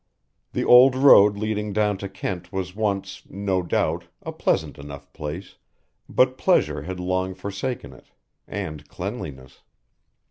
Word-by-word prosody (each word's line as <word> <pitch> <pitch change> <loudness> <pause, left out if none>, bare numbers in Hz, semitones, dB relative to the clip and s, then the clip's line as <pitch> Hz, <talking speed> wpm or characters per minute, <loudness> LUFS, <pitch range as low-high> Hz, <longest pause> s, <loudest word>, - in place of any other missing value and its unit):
The - - -1
old 125 +1 +7
road 105 -7 +7
leading 105 -1 -2
down 105 -1 +1
to 100 - -5
Kent 90 -2 -5
was 95 -1 -4
once, 100 -2 -2
no 95 -1 -1
doubt, 85 - -1 0.2
a - - -5
pleasant - - -1
enough 70 0 -10
place, 75 +6 -7 0.5
but - - +2
pleasure - - +2
had 90 +4 -6
long 95 +1 -1
forsaken 100 - -5
it, 65 - -18 0.4
and 75 -2 -6
cleanliness. 65 -1 -7
95 Hz, 135 wpm, -24 LUFS, 85-105 Hz, 0.5 s, old